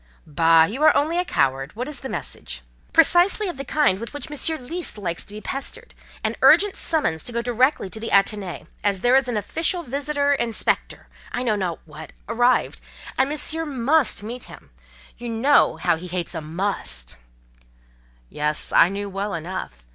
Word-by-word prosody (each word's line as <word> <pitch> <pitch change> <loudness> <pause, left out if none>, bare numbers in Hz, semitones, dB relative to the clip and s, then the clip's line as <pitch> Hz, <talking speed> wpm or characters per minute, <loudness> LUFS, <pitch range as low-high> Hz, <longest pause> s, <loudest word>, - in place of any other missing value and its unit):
"Bah! 165 +2 +4
you 225 - -2
are 310 -1 +6
only 325 +4 +1
a - - +2
coward. 135 - -1
What 250 +4 -4
is 300 -2 -5
the 265 - -7
message?" - - -6 0.3
"Precisely 350 +6 +4
of 350 - -5
the 275 - -5
kind 280 -9 +2
with 230 +6 -6
which 295 +1 -6
Monsieur 315 +2 0
least 325 +2 -4
likes 170 -5 -4
to - - -16
be 215 - -7
pestered: 275 +4 -5 0.3
an - - 0
urgent 410 -1 +6
summons 295 - 0
to - - -7
go 235 0 -2
directly 250 0 +1
to 220 - -5
the 230 - -5
Athénée, 200 -2 0 0.2
as 200 -2 +1
there 245 +1 +4
is 270 -1 +3
an 240 -3 -1
official 325 - -1
visitor—inspector—I 285 -3 -1
know 225 -4 +1
not 185 -5 -3
what—arrived, 165 - -1 0.3
and 265 +1 +2
Monsieur 315 +2 -1
must 280 -3 +1
meet 240 +4 -7
him: - - -14 0.5
you 240 0 -6
know 255 +6 +3
how - - +1
he 180 +3 -8
hates 175 -1 -3
a - - -4
must." 155 - -3 1.1
Yes, 150 - +2
I 170 - +6
knew 200 +1 -4
well 200 0 -3
enough. 160 - -6
230 Hz, 170 wpm, -23 LUFS, 180-285 Hz, 1.1 s, are